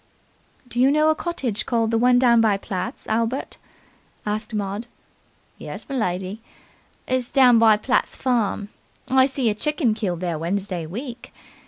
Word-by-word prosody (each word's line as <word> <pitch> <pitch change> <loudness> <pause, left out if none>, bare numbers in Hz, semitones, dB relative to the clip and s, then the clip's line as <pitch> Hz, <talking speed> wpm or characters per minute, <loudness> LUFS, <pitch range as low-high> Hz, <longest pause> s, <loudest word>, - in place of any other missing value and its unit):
"Do 245 0 -4
you 260 +2 +5
know 305 +2 +3
a - - 0
cottage 270 -11 -2
called 230 -1 +1
'the 230 - +2
one 250 +1 +4
down 240 -2 +5
by 215 -3 +3
Platt's', 185 -2 -5
Albert?" 230 +4 -2 0.7
asked 215 +3 -2
Maud. 205 +2 -3 0.7
"Yes, - - -7
m'lady. 190 -6 -3 0.7
It's 255 -1 -1
down 250 -4 +5
by 220 -2 +6
Platt's 255 +4 0
farm. 225 -5 -1 0.4
I 260 0 +5
see 265 -3 -2
a - - -1
chicken 285 +1 0
killed 190 -6 -3
there 170 -4 -2
Wednesday 180 -1 -3
week. 240 - -7
230 Hz, 150 wpm, -23 LUFS, 200-255 Hz, 0.7 s, by